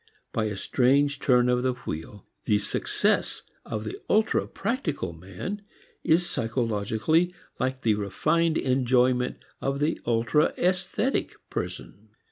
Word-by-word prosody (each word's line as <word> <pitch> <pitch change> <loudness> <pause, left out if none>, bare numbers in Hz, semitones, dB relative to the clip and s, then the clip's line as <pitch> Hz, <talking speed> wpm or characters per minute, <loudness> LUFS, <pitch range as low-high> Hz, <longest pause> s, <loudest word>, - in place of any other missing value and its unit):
By 110 - +1
a 105 -2 -3
strange 140 +6 +2
turn 125 -3 +4
of 125 0 +2
the 130 0 +1
wheel, 100 -3 -7 0.2
the 105 - +3
success 105 0 0 0.2
of 110 -1 -4
the 110 - -6
ultra 215 +1 +2
practical 190 - -2
man 95 - -6 0.4
is 170 +2 +3
psychologically 115 - +1 0.3
like 130 0 -1
the 110 - +4
refined 155 - +1
enjoyment 125 -1 +2 0.2
of 135 0 -1
the 150 +3 0
ultra 115 +6 +2
esthetic 185 +8 0 0.2
person. - - -5
125 Hz, 120 wpm, -27 LUFS, 110-160 Hz, 0.4 s, turn